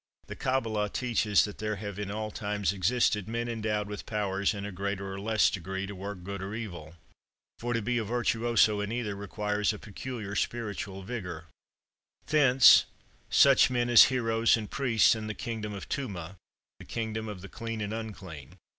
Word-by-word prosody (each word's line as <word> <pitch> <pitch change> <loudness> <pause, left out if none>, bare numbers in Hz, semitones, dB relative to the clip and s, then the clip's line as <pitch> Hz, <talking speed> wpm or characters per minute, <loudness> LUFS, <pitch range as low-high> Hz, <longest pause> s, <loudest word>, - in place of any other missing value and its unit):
The - - -8
"Cabbalah" 115 -6 0
teaches 110 -3 +2
that 105 - -8
there 110 0 -2
have 100 -1 -6
in 105 -1 -3
all 105 +1 -4
times 105 -2 -1
existed 105 +1 +1
men 115 +1 -2
endowed 110 -3 -2
with 105 -1 -7
powers, 100 -2 0
in 100 -2 -5
a 105 - -5
greater 100 +1 -4
or 95 - -6
less 110 +1 +3
degree, 95 +1 -4
to 100 - -7
work 95 -1 -7
good 100 +1 -5
or 100 +2 -5
evil; 85 -8 -7 0.6
for, 120 +1 -2
to 115 - -1
be 120 +2 0
a - - -1
virtuoso 115 -1 +2
in 105 +1 -3
either, 115 -4 -2
requires 105 +1 -1
a - - -7
peculiar 105 0 -7
spiritual 100 -4 -3
vigor: 90 -8 -6 0.8
thence, 135 -4 +7 0.4
such 135 -2 +6
men 120 -1 0
as 115 - +10
heroes 115 -3 +2
and 105 -2 -6
priests 120 -6 +4
in 110 -1 -5
the 110 - -4
kingdom 110 -3 -4
of 100 -1 -7
Tumah 100 -9 -4 0.4
(the - - -11
kingdom 110 -1 -4
of 105 -4 -7
the 100 - -8
clean 115 +2 -5
and 105 0 -3
unclean). 95 -9 -8
105 Hz, 180 wpm, -29 LUFS, 100-115 Hz, 0.8 s, as